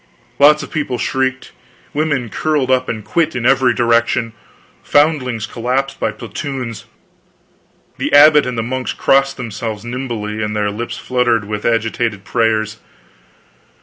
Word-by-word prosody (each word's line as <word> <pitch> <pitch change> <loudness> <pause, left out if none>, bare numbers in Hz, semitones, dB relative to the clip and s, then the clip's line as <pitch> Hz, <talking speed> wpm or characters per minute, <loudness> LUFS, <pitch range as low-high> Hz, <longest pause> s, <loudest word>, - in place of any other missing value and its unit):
Lots 150 +2 +6
of - - -10
people 145 -5 -2
shrieked, 130 +1 -2 0.4
women 145 -5 -1
curled 150 +1 0
up 130 0 +1
and 110 -2 -4
quit 155 +9 0
in 120 -1 -2
every 130 -1 +4
direction, 115 0 +1 0.5
foundlings 135 -7 +1
collapsed 130 +4 -2
by - - 0
platoons. 120 +1 -6 1.1
The - - -1
abbot 150 -1 +7
and 125 -2 -3
the 115 - 0
monks 130 +2 -3
crossed 135 0 +2
themselves 115 -3 -5
nimbly 120 -4 -4
and 105 0 -2
their 105 -1 0
lips 115 +3 -5
fluttered 120 -4 0
with 105 0 -3
agitated 115 -2 -1
prayers. 110 -1 0
120 Hz, 135 wpm, -17 LUFS, 115-135 Hz, 1.1 s, abbot